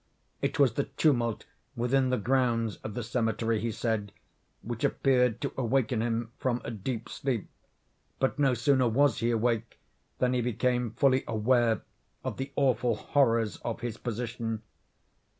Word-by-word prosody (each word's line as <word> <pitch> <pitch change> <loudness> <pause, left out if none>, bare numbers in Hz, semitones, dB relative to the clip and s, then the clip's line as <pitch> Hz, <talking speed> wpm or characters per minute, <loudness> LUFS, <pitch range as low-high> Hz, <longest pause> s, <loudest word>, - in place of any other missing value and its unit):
It - - -1
was 135 -6 +4
the 140 - 0
tumult 120 -7 +1 0.3
within 130 +2 +2
the 125 - +2
grounds 115 -1 +1
of 110 - -7
the 120 - -2
cemetery, 115 -1 0
he 115 0 -1
said, 110 -2 -2 0.5
which 115 0 -5
appeared 125 -4 +2
to - - -2
awaken 125 -2 +1
him 115 0 -1
from 125 -2 0
a - - -3
deep 115 +2 -4
sleep, 125 -7 -2 0.7
but 135 +2 0
no 135 -3 +3
sooner 130 +1 +3
was 140 +2 +3
he 115 +2 +1
awake 115 0 0 0.4
than 125 0 +2
he 125 - +1
became 125 +1 0
fully 135 -1 +3
aware 115 -1 +2 0.4
of - - -4
the 135 +1 -4
awful 125 -4 +2
horrors 115 -2 +2
of 115 -2 -5
his 115 -2 -4
position. 115 -1 -4
120 Hz, 150 wpm, -29 LUFS, 115-130 Hz, 0.7 s, was